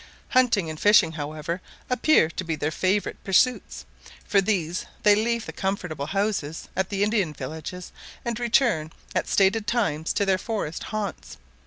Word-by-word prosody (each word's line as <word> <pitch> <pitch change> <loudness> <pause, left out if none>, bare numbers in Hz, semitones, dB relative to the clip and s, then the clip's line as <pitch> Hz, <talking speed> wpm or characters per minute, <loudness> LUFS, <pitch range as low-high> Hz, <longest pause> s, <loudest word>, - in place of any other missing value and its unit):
Hunting 245 -9 +3
and 155 -1 -6
fishing, 205 -6 +5
however, 155 +3 -4 0.3
appear 250 - +3
to 185 - -4
be 165 -2 -2
their 150 +1 -2
favourite 190 +5 -1
pursuits: 240 +6 +1 0.4
for 200 - +3
these 185 -4 -1 0.2
they 210 - +7
leave 230 +2 0
the - - -7
comfortable 180 -7 -3
houses 195 -6 -2
at 190 0 0
the 200 0 0
Indian 205 -7 +1
villages, 160 +6 -7 0.3
and 235 -1 -2
return 235 - +2 0.2
at - - 0
stated 205 +2 +2
times 165 -11 0
to 200 - +1
their 190 -1 +2
forest 205 -8 -4
haunts. 210 -3 -5
195 Hz, 155 wpm, -25 LUFS, 160-215 Hz, 0.4 s, they